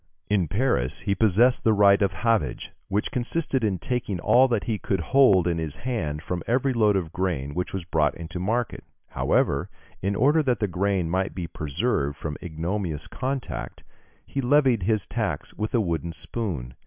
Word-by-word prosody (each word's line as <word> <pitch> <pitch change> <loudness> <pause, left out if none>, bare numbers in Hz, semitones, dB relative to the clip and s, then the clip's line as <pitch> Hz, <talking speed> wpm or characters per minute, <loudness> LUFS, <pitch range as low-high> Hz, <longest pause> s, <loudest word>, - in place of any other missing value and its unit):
In 95 -5 +2
Paris, 85 - 0
he 100 - 0
possessed 110 +5 +3
the 110 - +4
right 100 -1 +5
of 100 -1 +2
havage, 110 - 0 0.2
which 105 +2 -1
consisted 130 +1 -1
in 100 -4 +1
taking 110 -2 -2
all 125 +9 +5
that 115 -5 0
he 110 -3 -2
could 95 - -1
hold 100 -1 +4
in 85 -1 0
his 80 -2 -3
hand 80 -12 -3
from 90 0 -3
every 130 +3 +1
load 105 -4 +3
of 85 -5 -2
grain 80 -7 -2
which 90 +3 -3
was 95 -3 -4
brought 80 -4 +1
into 85 +1 -6
market; 115 +5 -1 0.3
however, - - +1 0.3
in 100 +1 0
order 145 +8 +4
that 125 -6 0
the 105 - +1
grain 95 -1 0
might 95 +3 -1
be 90 -2 -3
preserved 75 - -2
from 75 -2 -4
ignominious 85 -1 -3
contact, 135 0 -4 0.4
he 140 - -3
levied 130 -3 +3
his 105 +1 +1
tax - - -3
with 110 +3 -3
a - - +4
wooden 85 -4 -2
spoon. 80 - -4
100 Hz, 180 wpm, -25 LUFS, 85-120 Hz, 0.4 s, right